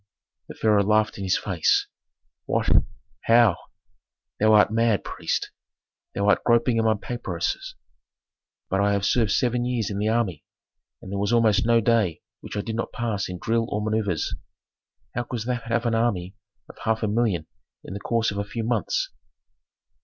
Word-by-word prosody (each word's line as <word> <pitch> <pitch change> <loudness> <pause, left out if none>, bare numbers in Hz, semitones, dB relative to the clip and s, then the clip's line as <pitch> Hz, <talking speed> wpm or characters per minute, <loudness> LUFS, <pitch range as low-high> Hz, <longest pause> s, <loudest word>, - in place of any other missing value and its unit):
The - - -9
pharaoh 105 -2 +3
laughed 105 +1 +1
in - - -4
his 95 0 +2
face. 90 -5 +1 0.6
"What? - - 0 0.6
How? 115 -5 +5 0.8
Thou 110 +1 +4
art 105 0 +5
mad, 115 -2 +2
priest! - - -3 0.6
Thou 100 - 0
art 100 - +3
groping 120 0 +3
among 110 -2 +1
papyruses, 95 -8 -3 0.9
but 95 +1 0
I 100 0 +2
have 100 -1 0
served 115 -1 +2
seven 120 +3 +1
years 120 -4 -1
in 100 - -3
the 105 - 0
army, 110 -8 0 0.6
and 95 - -8
there 100 - -2
was 100 +2 0
almost 115 -2 +3
no 115 -1 +4
day 105 -7 +1 0.2
which - - -7
I - - 0
did 110 +1 -5
not 115 - -3
pass 110 -6 -2
in 90 - -5
drill 115 +4 0
or 105 - -1
manœuvres. 105 -5 -1 0.8
How 120 - -1
couldst 120 -2 -5
thou 125 -1 -1
have 120 +1 -1
an 115 - +1
army 100 -5 0 0.3
of - - -14
half 110 0 -1
a - - +2
million 105 -7 0 0.4
in - - -8
the 100 - -5
course 115 +1 0
of 100 - -4
a - - 0
few 115 +3 -5
months?" - - -1
110 Hz, 175 wpm, -24 LUFS, 100-115 Hz, 0.9 s, How